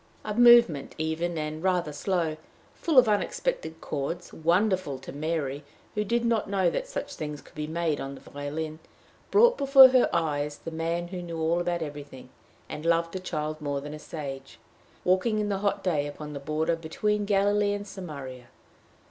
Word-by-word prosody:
A 210 - -2
movement 235 - +6
even 160 +2 -2
and 155 0 -4
rather 180 -4 0
slow, 165 -1 -1 0.4
full 320 -5 -1
of 250 -2 +8
unexpected 210 - -1
chords, 160 +5 -4
wonderful 175 -2 +1
to 130 - -9
Mary, 145 -2 -3 0.3
who 210 - 0
did 235 +3 0
not 230 -3 +1
know 190 -3 +2
that - - -3
such 290 -12 -5
things 150 -1 -5
could - - -18
be 150 0 -4
made 160 -1 -1
on 135 0 -5
the - - -13
violin, 155 +2 -5 0.5
brought 475 +4 +5
before 270 -1 +9
her 255 -1 +4
mind's 150 -3 -1
eye - - -21
the 165 - -4
man 165 +2 -2
who 180 -1 -5
knew 170 -1 -6
all 165 +2 +1
about 175 -1 -1
everything, 145 -4 -9 0.4
and 150 - -7
loved 165 +1 +1
a - - -2
child 155 -3 -4
more 145 -1 -2
than 145 +1 -7
a 150 - -7
sage, 135 -4 -7 0.5
walking 190 +5 +2
in 210 -1 0
the 195 -1 -1
hot 200 0 -1
day 150 -6 0
upon 150 +1 -8
the 140 - -5
border 155 +3 0
be 165 -1 -10
tween 210 +4 0
Galilee 205 0 +2
and 205 0 -5
Samaria. 140 -10 -8
165 Hz, 185 wpm, -27 LUFS, 150-200 Hz, 0.5 s, before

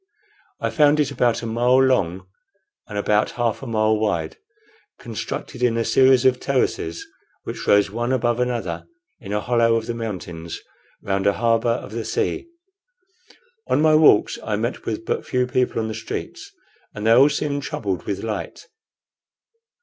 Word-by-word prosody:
I - - -2
found 150 -1 +4
it 150 - +1
about 120 -1 +1
a - - -3
mile 120 +3 +2
long 95 -9 +2 0.6
and 105 - -6
about 105 +1 +2
half 120 -2 0
a 135 - -7
mile 110 -1 +2
wide, 100 -7 -1 0.6
constructed 125 - -6
in 120 -2 +2
a 115 - 0
series 130 -1 +4
of 130 -1 +4
terraces, 105 -11 -1 0.4
which - - -6
rose 100 -1 +4
one 120 +3 -2
above 120 -2 +1
another 120 -9 -2 0.3
in 100 -7 -9
a 105 - 0
hollow 115 0 +2
of 115 -1 -1
the 120 - -3
mountains 90 -7 -6 0.4
round 100 0 0
a 100 - +4
harbor 115 +1 +1
of 115 -3 -2
the 115 +1 -4
sea. 335 - -2 1.2
On - - +2
my 155 0 +4
walks 155 -9 +5
I 110 - -1
met 115 +4 -3
with 110 0 -3
but - - -2
few 125 0 0
people 125 -1 0
on 110 - -1
the 110 - -4
streets, - - -6 0.5
and 105 - -5
they 115 - +4
all 130 +5 +7
seemed 145 -1 -2
troubled 100 -8 -4
with 100 - -2
the - - -5
light. 105 -3 -5
115 Hz, 170 wpm, -22 LUFS, 105-125 Hz, 1.2 s, all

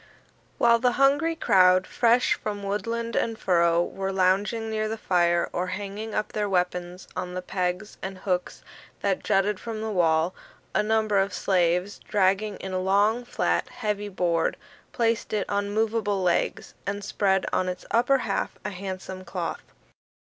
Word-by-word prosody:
While 235 -1 +5
the 245 0 +2
hungry 285 +5 +3
crowd, 185 -8 +4
fresh 240 +1 +3
from 205 -1 -5
woodland 230 +3 -2
and 225 -1 0
furrow, 170 -3 +3
were 195 +2 -3
lounging 195 +4 +1
near 215 0 -1
the 225 - -3
fire 175 -4 +2
or 180 +1 -1
hanging 205 +3 -5
up 215 - -1
their 210 -1 -1
weapons 180 0 -1
on 180 0 -4
the 185 - -2
pegs 180 +2 -3
and 190 0 -5
hooks 185 -1 -2 0.4
that 195 -2 0
jutted 195 0 +1
from 225 -2 -5
the 220 0 -3
wall, 165 -2 +2 0.4
a 200 - +3
number 215 -1 +2
of 195 -1 0
slaves, 180 +1 +1
dragging 200 +1 +1
in 190 -1 -6
a 185 - 0
long, 205 +5 +2
flat, 85 - -1
heavy 205 -1 -3
board, 170 -4 0 0.3
placed 230 -2 0
it 210 -2 0
on 200 0 -1
movable 210 -2 0
legs, 175 -1 0
and 200 0 -3
spread 190 -1 +1
on 185 - +1
its 180 - -6
upper 245 +4 +4
half - - -2
a 210 - -2
handsome 190 0 -6
cloth. - - -5
200 Hz, 160 wpm, -26 LUFS, 185-215 Hz, 0.4 s, While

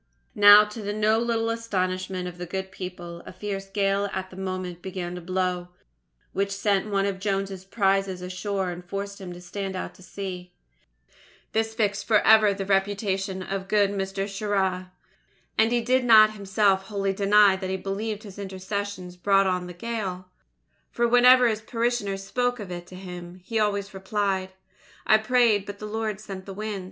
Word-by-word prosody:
Now, 205 0 +9
to 210 +1 -7
the 205 0 -3
no 215 +1 +2
little 230 -1 0
astonishment 185 -5 -2
of 175 0 -9
the 180 - -5
good 190 +2 -4
people, 175 -2 -7
a - - -7
fierce 195 -2 -5
gale 200 0 0
at 190 0 -4
that - - -11
moment 185 -2 -4
began 180 -2 -5
to 180 - -6
blow, 180 0 -1 0.7
which 200 +1 0
sent 200 +1 0
one 195 -1 +1
of 195 -1 -2
Jones's 195 -1 -2
prizes 195 -2 +1
ashore 185 +1 -2
and 175 0 -8
forced 200 +2 -5
him 185 -2 -7
to 175 - -9
stand 190 +2 -5
out 185 - -5
to - - -19
sea. 185 -1 -7 1.0
This 220 0 -1
fixed 210 -2 0
for 215 -1 +5
ever 215 -1 +6
the 195 0 -3
reputation 195 -1 0
of 195 0 -4
good 205 -1 +3
Mr. 195 0 -2
Shirra. 195 -3 -1 0.6
And 225 +1 +3
he 240 0 +2
did 255 +2 +2
not 215 -3 +7
himself 195 -1 +1
wholly 195 -2 -1
deny 200 0 +5
that 190 -1 -5
he 190 - -1
believed 205 +3 -4
his 205 -2 -10
intercessions 190 -1 -5
brought 195 +1 +3
on 180 -1 -1
the - - -7
gale, 185 -2 -4 0.6
for 235 0 +1
whenever 250 +1 +7
his 220 -1 -1
parishioners 230 -4 -1
spoke 245 +4 -1
of 200 -4 -7
it 175 0 -6
to 185 - -11
him, 180 -1 -9
he 225 +4 -1
always 200 -2 0
replied: 190 -1 -2 0.5
"I 215 - +5
prayed, 220 -3 +3
but 205 0 -6
the 210 - -7
Lord 215 -1 -3
sent 195 -3 -8
the 195 - -7
wind." 210 -1 -4
195 Hz, 180 wpm, -25 LUFS, 185-210 Hz, 1.0 s, Now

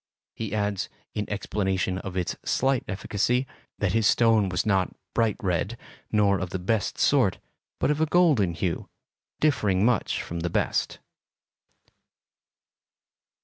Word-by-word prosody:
He 110 -1 -4
adds, 105 -2 -1 0.2
in 105 -1 -3
explanation 95 -2 -1
of 95 -1 -6
its 90 - -1
slight 135 -1 +1
efficacy, 105 +6 0 0.3
that - - 0
his 110 -1 +3
stone 110 -4 +4
was 90 0 -1
not 95 -3 +1 0.2
bright 115 -3 +1
red, 95 +5 -1 0.3
nor 100 -2 +3
of 90 - -3
the 95 - -3
best 100 +3 -1
sort, - - +3 0.4
but - - +2
of 150 +1 -1
a 160 - +3
golden 150 - +3
hue, 85 +1 -2 0.5
differing 105 -10 +2
much 120 -4 +1
from 85 - -5
the 85 +1 -2
best. - - 0
100 Hz, 135 wpm, -26 LUFS, 95-115 Hz, 0.5 s, stone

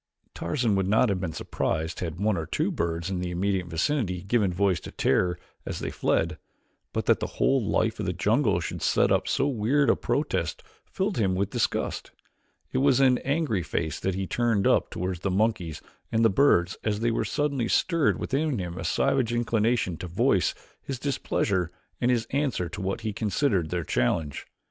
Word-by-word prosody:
Tarzan 110 - 0
would 95 -1 +1
not 110 +4 +4
have 95 -2 0
been 90 -3 -3
surprised 80 +1 -2
had 85 -1 -4
one 105 0 +2
or 80 -3 -3
two - - 0
birds 85 +2 -2
in 95 - -1
the 90 0 -3
immediate 95 +1 -1
vicinity 90 - -1
given 100 -1 +1
voice 95 -1 +1
to - - -9
terror 90 +6 +1 0.3
as - - -4
they - - -4
fled, - - 0 0.5
but - - -2
that - - +4
the - - -2
whole 135 -3 +3
life 110 +2 0
of 105 - -2
the - - +1
jungle 105 - +2
should 85 - -5
set - - +3
up - - +2
so - - +1
weird 135 +3 +2
a - - +2
protest - - -1 0.2
filled 190 - -2
him 95 -4 +2
with 95 +1 -1
disgust. - - -1 0.6
It - - 0
was 135 -1 +4
an 130 -2 +4
angry 140 - 0
face 80 -2 -2
that 95 -1 -1
he 95 0 -2
turned 115 -2 +1
up - - +3
toward 90 0 -3
the 95 +3 -2
monkeys 95 -5 0 0.3
and 115 0 +3
the 110 - +5
birds 95 -6 +3
as 105 -1 -1
there 115 -1 +1
suddenly 140 -5 -1
stirred 165 +3 +2
within 145 0 -1
him 90 -2 -4
a - - -4
savage 120 +7 +1
inclination 115 -5 +1
to 90 - -6
voice 85 - +2 0.3
his 135 - -5
displeasure 100 - -1 0.3
and 120 - +2
his 120 -2 +2
answer 135 -10 0
to 90 - -6
what 95 +4 -2
he 110 -2 -3
considered 100 - 0
their 90 -1 -2
challenge. 70 +3 -1
100 Hz, 190 wpm, -27 LUFS, 90-120 Hz, 0.6 s, the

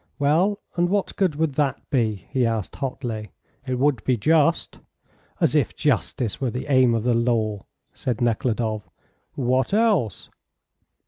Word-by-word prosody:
"Well, 165 +8 +2 0.2
and 175 0 +2
what 200 0 -1
good 185 -6 +1
would 155 -1 0
that 140 -1 0
be?" 110 - 0
he 130 -2 +1
asked, 115 -4 -2
hotly. 120 -7 -4 0.3
"It 130 - 0
would 135 -3 +1
be 130 -2 +1
just." 160 +8 +2 0.6
"As - - +2
if - - +1
justice 115 -1 -1
were 130 - +1
the 125 +3 -4
aim 130 -3 +5
of 115 - -1
the 125 0 +2
law," 115 -4 0 0.3
said 125 -4 -3
Nekhludoff. 110 -3 -1 0.5
"What 130 +5 +1
else?" 210 - +1
125 Hz, 145 wpm, -23 LUFS, 115-145 Hz, 0.6 s, aim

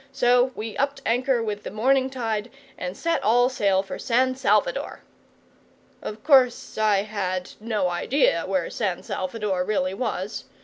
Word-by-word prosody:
So 250 -2 +4
we 220 0 -5
upped 280 0 0
anchor 245 +1 +1
with 210 -2 -3
the - - -6
morning 260 +5 +2
tide, 225 -3 -3 0.3
and 180 0 -5
set 335 0 -1
all 245 +4 +4
sail 195 -6 +1
for 195 - -7
San 255 +1 +2
Salvador. - - 0 1.0
Of 215 +1 -7
course 265 -5 +3
I 210 -2 +2
had 185 -4 -3
no 215 -4 -1
idea 175 - +1
where 185 -3 -1
San 190 -6 -2
Salvador 190 -1 -2
really 185 -2 -1
was. 205 -3 -3
220 Hz, 145 wpm, -24 LUFS, 195-255 Hz, 1.0 s, So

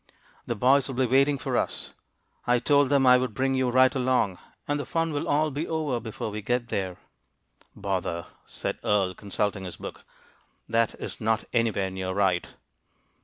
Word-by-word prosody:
"The 120 - -1
boys 130 +5 +4
will 135 - -5
be 130 +1 +2
waiting 140 +3 +3
for - - -3
us; - - -2 0.5
I 125 0 +4
told 140 +2 +3
them 140 -2 +4
I 125 0 +7
would 125 -4 -3
bring 135 +2 +1
you 130 -1 +1
right 130 +1 +5
along, 125 -8 +1 0.3
and 145 0 0
the - - -2
fun 165 -1 0
will 145 - -2
all 150 +1 +2
be 150 +4 -3
over 155 -6 -1
before 110 -1 -5
we 105 +1 -4
get 120 +2 -1
there." 95 -3 -2 0.8
"Bother!" 95 -4 -2 0.2
said - - -4
Earle, 100 -3 +2
consulting 100 0 -2
his 90 - -7
book. - - -8 0.6
"That 115 0 +1
is - - -7
not 110 0 +1
anywhere 110 -5 +1
near 95 0 -3
right." 95 -3 +1
120 Hz, 175 wpm, -27 LUFS, 100-135 Hz, 0.8 s, I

